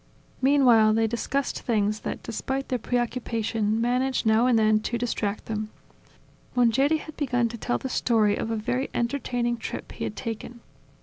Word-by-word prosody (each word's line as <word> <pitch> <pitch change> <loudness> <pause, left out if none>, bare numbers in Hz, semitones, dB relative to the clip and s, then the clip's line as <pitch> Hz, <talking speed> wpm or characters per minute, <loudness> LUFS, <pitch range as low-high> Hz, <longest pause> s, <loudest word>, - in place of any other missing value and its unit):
Meanwhile 250 -6 +5
they 225 0 +3
discussed 245 +4 -2
things 215 -2 0
that, - - -5
despite 265 +4 -3
their 250 - 0
preoccupation, 230 -3 -1
managed 250 +2 +1
now 220 +3 +4
and 245 -2 +4
then 215 -1 +4
to 235 +2 -2
distract 215 -3 -2
them. 215 -1 -3 0.9
Mongeri 255 +6 +3
had 310 0 -10
begun 245 -4 +1
to 235 - -7
tell 245 - 0
the - - -5
story 220 -5 +2
of 225 - -3
a 225 - 0
very 245 +5 -2
entertaining 240 -1 -1
trip 230 - -6
he - - -6
had - - -3
taken. 235 0 -6
235 Hz, 165 wpm, -26 LUFS, 220-250 Hz, 0.9 s, Meanwhile